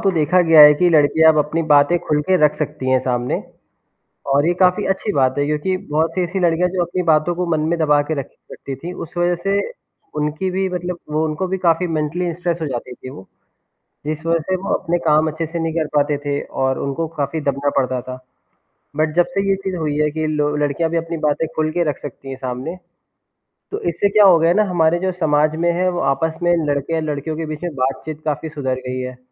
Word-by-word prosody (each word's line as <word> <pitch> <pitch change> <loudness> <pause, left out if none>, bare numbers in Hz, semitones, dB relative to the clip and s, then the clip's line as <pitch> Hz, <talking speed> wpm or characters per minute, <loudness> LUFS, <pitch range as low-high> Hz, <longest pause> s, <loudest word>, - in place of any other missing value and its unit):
तो 195 - +2
देखा 175 +1 +2
गया 165 -2 +6
है 150 0 +10
कि 175 +4 +2
लड़कियाँ 160 +1 +5
अब 155 - 0
अपनी 150 +3 0
बातें 145 +4 +5
खुल 150 -1 +1
के 190 - +5
रख 150 - +3
सकती 150 -3 -3
हैं 130 - +4
सामने 125 -1 -2 0.9
और 140 +2 +3
ये 175 - +3
काफ़ी 180 -1 +3
अच्छी 195 +2 -1
बात 130 -1 +2
है, 145 - +1
क्योंकि 150 +5 -1
बहुत 160 +2 0
से 185 - +1
ऐसी 180 +3 -3
लड़कियाँ 175 0 +2
जो 180 0 -1
अपनी 175 +2 -3
बातों 160 +1 +2
को 180 +1 -1
मन 160 - +1
में 170 - 0
दबा 150 -2 +3
के 145 +2 -3
रखे 135 - -11
रखती 135 - -7
थीं, 170 +7 -7
उस 165 - -8
वजह 175 0 +2
से 200 0 +1 0.6
उनकी 150 +5 -1
भी 190 +1 0
मतलब 180 -1 -4
वो 155 +1 +1
उनको 155 +4 -2
भी 190 +1 -2
काफ़ी 175 0 +1
मेंटली 165 +2 -2
स्ट्रेस 175 0 -2
हो 155 - -1
जाती 125 -1 -5
थीं 130 - -10
वो, 95 -7 -12 0.8
जिस 155 +1 -4
वजह 165 0 +2
से 190 - +2
वो 185 +2 -2
अपने 175 +1 0
काम 155 0 +4
अच्छे 160 +2 -4
से 165 +2 -5
नहीं 165 -1 -2
कर 160 -2 -1
पाते 145 0 +2
थे, 145 0 -3
और 130 0 -2
उनको 140 +4 -2
काफ़ी 145 +2 -2
दबना 140 0 0
पड़ता 130 -2 0
था। 130 +1 -8 0.8
बट 155 +1 0
जब 175 0 +4
से 195 0 0
ये 195 - +3
चीज़ 190 -1 -2
हुई 155 -3 -2
है 150 0 +2
कि 155 +1 -2
लो 150 -1 0
लड़कियाँ 150 +2 0
अपनी 165 0 -5
बातें 155 +1 0
खुल 155 0 0
के 175 +2 0
रख 145 - -3
सकती 135 -1 -9
हैं 135 - -5
सामने, 130 +5 -5 1.0
तो 410 - -4
इससे 170 +4 +1
क्या 210 +1 +5
हो 185 -4 +7
गया 165 +1 +2
है - - +3
ना 215 - +4
हमारे 170 -1 +2
जो 185 0 -1
समाज 155 -3 +1
में 175 - +3
है 180 +2 0
वो 175 - -3
आपस 160 +2 -3
में 175 0 +3
लड़के 145 +2 -1
और 160 - -1
लड़कियों 150 +2 -4
के 160 0 -4
बीच 155 +1 -6
में 175 -3 -4
बातचीत 135 +4 -3
काफ़ी 155 +1 -2
सुधर 140 -4 -3
गई 130 0 -3
है 125 0 -6
155 Hz, 235 wpm, -19 LUFS, 145-175 Hz, 1.0 s, है